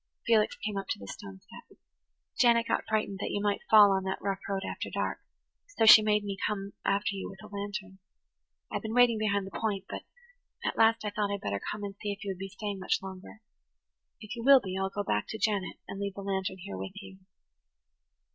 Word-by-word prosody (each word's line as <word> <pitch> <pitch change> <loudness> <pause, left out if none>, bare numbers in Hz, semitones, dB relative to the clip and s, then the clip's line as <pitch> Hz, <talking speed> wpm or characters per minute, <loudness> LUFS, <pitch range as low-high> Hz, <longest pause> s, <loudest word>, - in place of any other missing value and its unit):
Felix 220 -2 +3
came 210 -2 -4
up 195 -1 -4
to - - -2
the 100 - -10
stone 95 -1 -9
step. - - -15 0.6
"Janet 235 -1 +5
got - - 0
frightened 210 -3 -1
that - - -2
you - - -1
might 205 0 0
fall 210 -2 +8
on 190 -1 +1
that 190 - -2
rough 195 -1 -2
road 195 0 -1
after - - -4
dark, - - -2 0.6
so 225 - +4
she 220 0 +11
made 210 -1 +2
me 200 -1 -4
come 200 -1 -4
after 205 +2 +1
you 195 - -5
with 195 - -11
a 210 -1 -10
lantern. 200 -1 -5 0.7
I've - - -2
been 220 0 -4
waiting 245 -3 +5
behind 200 -2 +1
the 195 - -9
point, 205 -3 -1
but - - -5 0.6
at - - 0
last 225 0 +4
I 210 - -1
thought 205 0 -1
I'd 200 0 -3
better 100 0 -2
come 210 0 -5
and 200 -1 -5
see 205 - -2
if 200 +2 -7
you 200 - -2
would 185 - -7
be 195 - -4
staying 205 0 -5
much 185 - 0
longer. 190 +3 -9 0.8
If 215 +1 -7
you 235 - -6
[Page 240 - -4
110] 280 - +10
will - - +7
be, - - -3
I'll 195 0 0
go 205 +1 -3
back 105 - 0
to 220 - -5
Janet 205 -4 -1
and 195 - -6
leave 200 -1 -3
the 200 - -6
lantern 190 -1 -2
here 100 - -7
with 95 - -6
you." 190 -1 -12
200 Hz, 230 wpm, -30 LUFS, 195-215 Hz, 0.8 s, she